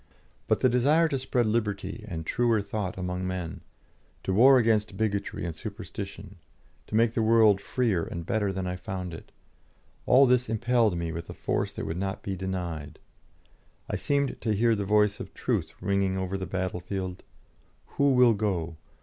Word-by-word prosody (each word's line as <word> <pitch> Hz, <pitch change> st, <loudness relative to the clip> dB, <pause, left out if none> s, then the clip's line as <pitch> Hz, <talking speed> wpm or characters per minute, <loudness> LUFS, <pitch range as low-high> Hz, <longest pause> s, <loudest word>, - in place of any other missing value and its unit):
But -, -, +1 dB
the -, -, +5 dB
desire 140 Hz, +7 st, +3 dB
to 135 Hz, -, -1 dB
spread 125 Hz, -2 st, 0 dB
liberty 105 Hz, -1 st, -2 dB
and 80 Hz, -5 st, -5 dB
truer 120 Hz, +1 st, +2 dB
thought 100 Hz, -2 st, -4 dB
among 90 Hz, 0 st, -3 dB
men, 90 Hz, -3 st, -4 dB, 0.6 s
to 95 Hz, -, -1 dB
war 130 Hz, +6 st, +7 dB
against 110 Hz, -4 st, +1 dB
bigotry 105 Hz, -5 st, -2 dB
and 85 Hz, -2 st, -4 dB
superstition, -, -, -8 dB, 0.5 s
to -, -, -4 dB
make 115 Hz, 0 st, +3 dB
the 115 Hz, -, 0 dB
world 110 Hz, -3 st, +5 dB
freer 110 Hz, -6 st, 0 dB
and 85 Hz, -1 st, -6 dB
better 105 Hz, -1 st, 0 dB
than 95 Hz, 0 st, -3 dB
I 90 Hz, 0 st, -3 dB
found 90 Hz, -1 st, -5 dB
it 80 Hz, -, -10 dB, 0.8 s
all 135 Hz, +2 st, +7 dB
this 125 Hz, -2 st, +2 dB
impelled 115 Hz, -3 st, +2 dB
me 85 Hz, -1 st, -2 dB
with 85 Hz, 0 st, -6 dB
a -, -, -7 dB
force -, -, -1 dB
that -, -, -5 dB
would 80 Hz, -, -3 dB
not 95 Hz, +1 st, -3 dB
be 95 Hz, -, -3 dB
denied. 85 Hz, -5 st, -4 dB, 0.9 s
I -, -, -3 dB
seemed 140 Hz, -1 st, -1 dB
to 110 Hz, -3 st, 0 dB
hear 115 Hz, +3 st, +3 dB
the 100 Hz, -2 st, -1 dB
voice 105 Hz, 0 st, +3 dB
of -, -, -8 dB
Truth -, -, -2 dB
ringing 100 Hz, -1 st, +1 dB
over 95 Hz, 0 st, -2 dB
the 95 Hz, -1 st, -4 dB
battlefield: 95 Hz, 0 st, -3 dB, 0.6 s
"Who 140 Hz, 0 st, +1 dB
will 125 Hz, -2 st, +6 dB
go? 90 Hz, -6 st, -2 dB
100 Hz, 175 wpm, -27 LUFS, 90-115 Hz, 0.9 s, war